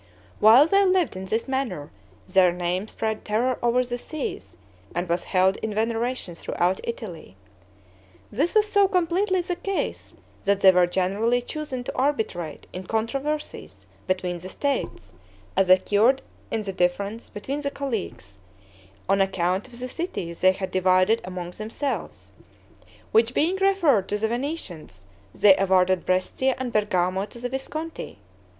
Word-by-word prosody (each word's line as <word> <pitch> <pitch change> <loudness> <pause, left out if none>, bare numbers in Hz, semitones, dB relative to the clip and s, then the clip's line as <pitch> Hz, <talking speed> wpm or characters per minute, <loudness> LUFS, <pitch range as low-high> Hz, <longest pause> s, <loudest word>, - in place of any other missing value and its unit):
While 230 +7 +8
they 395 +5 +4
lived 370 - +2
in 190 0 -6
this 220 +6 -2
manner, 255 - -3 0.4
their 185 -1 +4
name 180 +3 -2
spread 220 -1 -3
terror 235 +4 0
over 240 +1 +3
the 245 0 -4
seas, 100 - -6 0.4
and 175 +1 -1
was 170 +1 -1
held 190 0 +2
in 220 -2 -4
veneration 230 -2 -1
throughout 175 +2 -1
Italy. 180 - -7 1.0
This 295 - 0
was 430 0 +5
so 405 -1 +4
completely 370 +1 +1
the 355 0 -3
case, 390 +2 -4 0.3
that 200 -1 +1
they 190 - +8
were 180 -1 +4
generally 200 +7 +1
chosen 260 0 -5
to - - -6
arbitrate 220 - -2
in 185 0 -7
controversies 275 +7 -3 0.2
between 180 -1 -1
the 185 +2 -8
states, 280 +8 -3 0.4
as 190 -1 +2
occurred 205 +8 +4 0.3
in 225 -1 -2
the 195 -2 -4
difference 200 +5 -1
between 270 +8 -4
the 285 - -1
Colleagues, 205 - -5 0.7
on 195 +1 +3
account 190 +2 0
of 245 -2 -13
the 255 - -4
cities 250 - -5
they 185 0 +6
had 190 0 -5
divided 185 +4 +3
among 180 -1 -6
themselves; 225 +8 -5 0.8
which 225 +3 +3
being 345 +5 +2
referred 350 - +3
to 210 - 0
the 220 +1 0
Venetians, 220 - -5 0.3
they 200 -2 +7
awarded 185 -1 +2
Brescia 215 +8 +1
and 250 -2 -4
Bergamo 190 -2 +1
to - - -13
the 245 +1 -3
Visconti. 310 - -5
215 Hz, 145 wpm, -25 LUFS, 185-270 Hz, 1.0 s, While